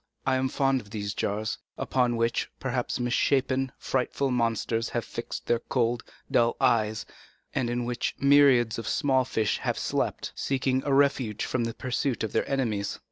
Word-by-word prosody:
I 130 - +3
am 130 0 0
fond 135 -1 +1
of 105 - -17
these 100 -1 -4
jars, 105 +2 -2 0.2
upon 125 -2 +1
which, 115 0 0
perhaps, 125 -1 -2
misshapen, 130 +1 +1
frightful 135 +1 -1
monsters 115 -1 0
have 120 - -2
fixed 115 - -6
their 120 - +2
cold, 120 -1 0 0.3
dull 115 0 +3
eyes, 110 -1 +2 0.5
and 120 - 0
in 120 0 -1
which 120 0 -2
myriads 135 -5 +5
of 115 - -6
small 130 -2 +2
fish 110 -4 0
have - - -1
slept, - - -1
seeking 130 -1 0
a - - +1
refuge 135 -6 +2
from 120 -2 -1
the 115 - -4
pursuit 130 0 -1
of 110 - -2
their - - 0
enemies." 115 -7 -1
120 Hz, 165 wpm, -27 LUFS, 115-130 Hz, 0.5 s, myriads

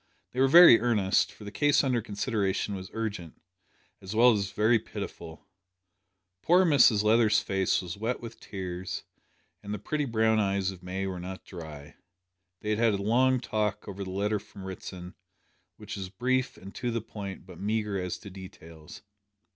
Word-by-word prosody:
They 125 - -5
were 135 - +5
very 170 -5 +9
earnest, 105 -5 +2
for - - -14
the 100 - -7
case 145 +4 +3
under 125 -4 +1
consideration 105 -1 -2
was 95 -2 -6
urgent, 105 -7 -5 0.6
as 95 +3 -7
well 120 +2 +7
as 100 -2 -1
very 110 +3 +3
pitiful. 100 -6 -8 1.0
Poor 180 +2 +4
Mrs 125 -9 +5
Leather's 110 0 +4
face 95 -1 0
was 90 +1 -6
wet 115 +3 -2
with 115 -1 -10
tears, 95 -3 -6 0.6
and 105 +1 -5
the - - -4
pretty 150 +9 -2
brown 110 -2 +2
eyes 100 -1 0
of 90 -2 -12
May 95 +2 -4
were 95 -2 -4
not 95 +1 -8
dry. 80 -4 -10 0.6
They 105 - -2
had 105 - 0
had 115 -2 +3
a 100 - -4
long 130 +4 +3
talk 105 -3 -2
over 100 0 -6
the 95 - -7
letter 100 +3 -1
from 100 - -13
Ritson, 90 -1 -8 0.6
which - - -7
was 95 -2 -6
brief 130 +6 -1
and 95 +1 -11
to 125 - -3
the 115 -1 -2
point 100 -3 -8
but 90 -3 -12
meagre 105 -1 -1
as 90 -1 -4
to 100 - -10
details. 85 -4 -12
105 Hz, 175 wpm, -28 LUFS, 95-115 Hz, 1.0 s, very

